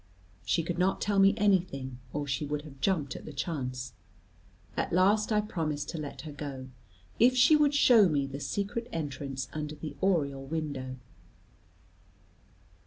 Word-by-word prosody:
She 130 - +1
could 175 +1 -3
not 190 +1 +2
tell 200 -1 +1
me 195 +1 +6
anything, 170 - +1
or 145 0 -2
she 135 +1 -2
would 145 0 -3
have 135 -3 -13
jumped 160 -9 0
at - - -8
the - - -8
chance. 130 -4 -4 0.8
At - - -1
last 205 +5 +3
I 210 -1 +3
promised 155 -8 -3
to 165 - -4
let 140 -3 -6
her 155 +1 -8
go, 140 -3 -7 0.5
if 250 +2 +5
she 255 +5 +7
would 295 -1 +3
show 230 -8 +6
me 145 -3 +1
the 135 +1 -6
secret 205 +8 -3
entrance 140 -4 -4
under 150 0 -4
the 150 -1 -7
oriel 145 -8 +1
window. 140 -3 -4
155 Hz, 160 wpm, -30 LUFS, 140-195 Hz, 0.8 s, she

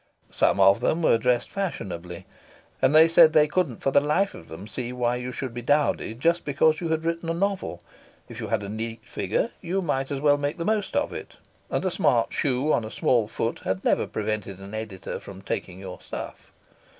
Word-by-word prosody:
Some - - +2
of 95 +2 +6
them 160 +7 0
were 115 - +4
dressed 125 0 +1
fashionably, 90 - -5 0.6
and 130 +3 +4
they 160 +1 +8
said 165 -1 +7
they 150 0 +5
couldn't 150 -7 -1
for 135 - +2
the - - +6
life 165 +7 +1
of 80 - -12
them 80 +5 -9
see 120 +3 -5
why 125 -1 0
you 125 +1 -5
should 130 -1 -5
be 120 - -5
dowdy 145 -3 +1
just 170 +8 +1
because 155 +3 +2
you 170 - -2
had 160 0 0
written 165 0 -2
a 165 - 0
novel; 190 - -2 0.4
if - - -9
you - - -4
had - - 0
a - - -5
neat 110 +2 -5
figure 230 - -1
you 185 +2 -1
might 135 -7 -1
as 140 -2 -2
well 145 0 +3
make 145 +1 -2
the 170 - -3
most 215 0 0
of 290 +1 0
it, - - -8 0.3
and - - -1
a 185 - +1
smart 120 -8 +2
shoe 140 0 +1
on 115 - +1
a 110 - -5
small 115 -1 +2
foot 115 +1 -2
had 95 0 -3
never - - +2
prevented 105 -3 -3
an 100 +2 -10
editor 105 -5 -5
from 95 -1 -11
taking 95 -1 -4
your 95 -2 -8
"stuff." - - -8
130 Hz, 215 wpm, -25 LUFS, 110-160 Hz, 0.6 s, they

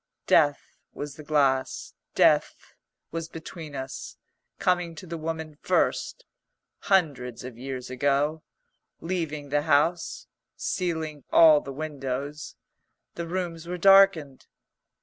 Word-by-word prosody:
Death 145 -3 +2 0.2
was 145 -1 -5
the 155 - -10
glass; 135 -3 0 0.2
death - - +2 0.4
was 165 0 -4
between 160 -2 -9
us; 130 -1 -7 0.4
coming 175 -2 0
to 185 - -9
the 170 -1 -6
woman 160 -1 -4
first, - - 0 0.5
hundreds 140 -11 0
of 125 -2 -8
years 130 0 -6
ago, 145 +4 +1 0.6
leaving 160 -5 -3
the 145 +1 +1
house, 160 +3 +1 0.3
sealing 160 -5 -3
all 155 -3 +7
the 135 - -8
windows; 140 - -5 0.6
the 170 0 -5
rooms 170 -2 -4
were 180 +1 -3
darkened. 195 -7 +5
155 Hz, 110 wpm, -26 LUFS, 140-165 Hz, 0.6 s, all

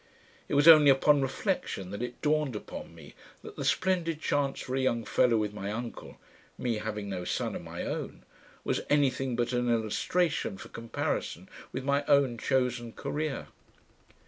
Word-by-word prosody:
It - - 0
was 145 +3 +5
only 155 -3 +10
upon 140 +2 +5
reflection 95 -7 -2
that 100 - -5
it 125 0 -6
dawned 150 -4 +1
upon 105 - -8
me 80 -3 -13 0.3
that - - -10
the - - -4
splendid 175 -4 +1
chance 145 -3 0
for 130 - -4
a - - +1
young 120 -3 0
fellow 120 -2 +3
with 105 -1 -1
my 100 -1 -4
uncle, 115 +2 -6 0.4
"me, 120 -3 -1
having 105 -1 -4
no 95 -2 -4
son - - -2
of - - -5
my - - -6
own," - - -5 0.4
was - - 0
anything 135 -3 +2
but 120 +1 -1
an 125 0 +1
illustration 120 - 0
for - - -10
comparison 115 0 -3 0.2
with 130 - -4
my 140 +1 +1
own 135 -5 +3
chosen 125 -3 0
career. 150 -1 -3
125 Hz, 170 wpm, -29 LUFS, 115-145 Hz, 0.4 s, only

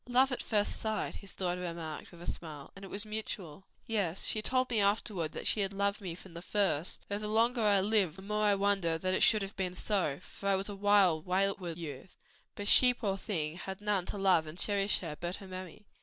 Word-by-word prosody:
"Love 260 +2 +4
at 250 - -2
first 210 -2 0
sight," 220 -1 -2
his 200 - -8
daughter 180 -1 -2
remarked, 165 -3 -6
with 170 -1 -12
a - - -8
smile, 150 -4 -6
"and 195 - -11
it - - -7
was 200 +2 -1
mutual." 195 -5 -5 0.2
"Yes 195 -6 -1
she 215 - +1
told 255 +2 +1
me 225 - +3
afterward 200 -5 +1
that - - -6
she - - +2
had 195 -1 +1
loved 200 +1 0
me 180 -4 -5
from 185 0 -13
the 170 - -7
first; 185 -4 0
though 205 0 -2
the 210 - -4
longer 230 +3 +2
I 205 -2 +4
live 200 -5 +2
the 190 - -11
more 210 +1 0
I 205 -1 +4
wonder 195 -5 +1
it 185 0 +1
should 215 -2 +5
have 195 - -7
been 185 -2 -2
so, 185 -9 0
for 200 - -5
I 195 - +4
was 195 +2 -2
a 205 - -5
wild, 195 -5 +3
wayward 185 -2 0
youth. 155 0 -8 0.4
But 205 - -5
she, 250 +3 +7
poor 205 -5 -1
thing, 170 -6 -3
had 190 +1 -6
none 205 -3 0
to - - -4
love 185 -5 +3
or 155 - -7
cherish 200 +3 +2
her 165 -4 -5
but 175 +1 -2
her 195 - -11
mammy." 185 +2 -9
195 Hz, 230 wpm, -32 LUFS, 175-210 Hz, 0.4 s, she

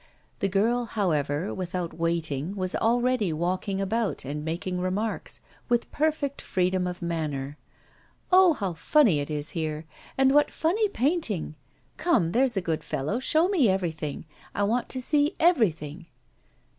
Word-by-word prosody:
The 195 - +1
girl, 230 +5 +1
however, 165 -6 -1
without 180 -2 -4
waiting, 165 0 -2
was 185 -1 +1
already 240 -4 +2
walking 185 +4 -1
about 205 - -1
and 150 +2 -4
making 175 +3 -3
remarks, 195 +5 -2 0.3
with 240 -1 +1
perfect 300 -2 -1
freedom 185 0 0
of 180 -1 -5
manner. 150 -4 -3 0.7
'Oh! 365 -2 +7
how 195 - -3
funny 185 - +3
it 145 - -3
is 150 0 -3
here. 155 -1 -3 0.3
And 265 0 +4
what 295 +1 +4
funny 400 +7 +1
painting. 260 - 0 0.4
Come, 260 - +2
there's 250 0 +2
a - - +2
good 165 -3 -2
fellow, 150 - -2
show 315 +6 +3
me 340 - +3
everything. 165 -6 -2 0.3
I 205 - +1
want 230 +4 0
to 260 - -3
see 295 +5 +2
everything. 180 - +1
190 Hz, 145 wpm, -26 LUFS, 165-250 Hz, 0.7 s, Oh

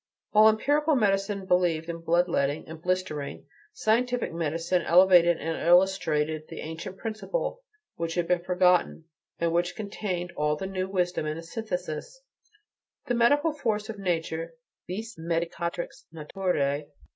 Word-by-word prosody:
While 215 +1 +7
empirical 290 +7 +2
medicine 200 -3 +1
believed 175 -3 +2
in 170 0 -4
blood 170 +2 +2
letting 140 +2 -1
and 160 0 -9
blistering, 180 -5 -2 0.3
scientific 245 - 0
medicine 165 +2 0
elevated 175 -1 +6
and 165 0 -3
illustrated 160 -4 +2
the - - -8
ancient 165 +4 -7
principle 230 - -3 0.4
which 165 0 -3
had 175 -1 0
been 175 -1 +1
forgotten, 180 -2 +2 0.3
and 170 0 0
which 175 +1 0
contained 190 -4 -4
all 150 0 +1
the 170 - -5
new 190 -1 -3
wisdom 180 -4 0
in 155 +1 -3
a 165 - -7
synthesis: 180 - -5 0.9
the 245 - -1
medicinal 290 +7 +3
force 215 -6 -2
of 215 -2 -6
nature, 165 -2 -2 0.3
vis 220 +2 -6
medicatrix 170 +1 -3
naturae. 150 -3 -1
180 Hz, 135 wpm, -27 LUFS, 165-205 Hz, 0.9 s, While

